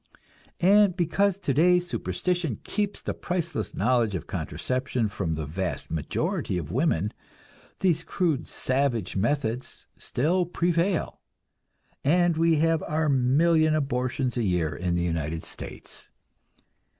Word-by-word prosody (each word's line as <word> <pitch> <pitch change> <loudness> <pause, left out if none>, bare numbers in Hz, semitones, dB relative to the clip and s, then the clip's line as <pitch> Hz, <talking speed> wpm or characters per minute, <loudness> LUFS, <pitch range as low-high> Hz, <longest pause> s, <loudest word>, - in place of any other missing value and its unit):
And 195 0 +5
because 180 +3 +2
today 180 +1 +3
superstition 175 - -2
keeps 205 -1 -2
the - - -2
priceless 175 -1 -3
knowledge 120 -5 +2
of 90 - -4
contraception 125 -3 -2
from 90 -4 -2
the 80 -1 -3
vast 85 +5 -4
majority 80 +3 -1
of 80 -3 -4
women, 110 - +1 0.7
these 170 -3 +2
crude, 165 -4 -1
savage 130 -6 0
methods 120 +3 -1
still 170 +7 0
prevail, 175 +1 0 0.8
and 175 +3 +3
we 165 0 +3
have 165 +1 +2
our 155 0 +1
million 155 +5 +3
abortions 130 -3 -1
a 120 - +1
year 85 -6 0
in 90 +2 -1
the 85 - 0
United 80 -1 -2
States. - - -8
140 Hz, 120 wpm, -26 LUFS, 105-170 Hz, 0.8 s, And